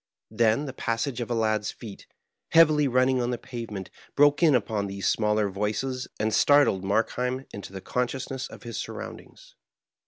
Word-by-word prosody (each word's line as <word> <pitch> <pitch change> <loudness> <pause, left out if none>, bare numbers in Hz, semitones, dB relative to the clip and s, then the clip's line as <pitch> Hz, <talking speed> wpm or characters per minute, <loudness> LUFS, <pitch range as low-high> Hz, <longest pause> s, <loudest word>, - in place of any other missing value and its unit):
Then 115 +5 +2
the 135 - -6
passage 120 +1 -2
of 120 - -4
a 120 - 0
lad's 110 -2 0
feet, 110 -5 -10 0.5
heavily 155 -3 +6
running 130 0 +2
on 120 - -1
the 125 - -1
pavement, 110 -7 -7 0.2
broke 145 +2 +4
in 155 -5 +5
upon 105 -3 -1
these 100 -1 -3
smaller 105 -1 +2
voices 110 +7 -2
and 110 0 0
startled 145 -10 +4
Markheim 125 +6 -1
into 100 -1 -8
the 95 -1 -7
consciousness 130 +3 -3
of - - -13
his 115 -2 -6
surroundings. - - -8
120 Hz, 160 wpm, -26 LUFS, 105-130 Hz, 0.5 s, heavily